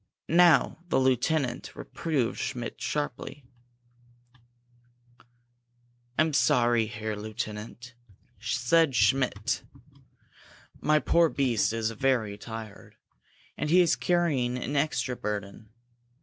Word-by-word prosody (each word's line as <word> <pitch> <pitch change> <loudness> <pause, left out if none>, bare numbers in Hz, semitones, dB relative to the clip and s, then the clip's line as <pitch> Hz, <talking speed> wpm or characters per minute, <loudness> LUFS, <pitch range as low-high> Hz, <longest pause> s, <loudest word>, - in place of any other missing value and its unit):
Now 170 -3 +4
the - - +3
lieutenant 130 0 0
reproved 140 -8 -2
Schmidt 120 -2 -4
sharply. 145 -1 -4 2.7
"I'm 155 0 +2
sorry, 120 -4 +3
Herr 110 0 -4
Lieutenant," 110 +2 -6 0.5
said 145 +3 +2
Schmidt. 105 -1 +1 1.2
"My 155 0 +3
poor 165 +2 +3
beast 125 -9 +1
is 115 0 -1
very 115 -3 0
tired, 110 0 -9 0.6
and 150 - -3
he 180 +3 +6
is 170 -2 +3
carrying 145 -9 0
an 130 +3 -4
extra 140 -3 0
burden. 105 0 -5
125 Hz, 90 wpm, -28 LUFS, 110-150 Hz, 2.7 s, he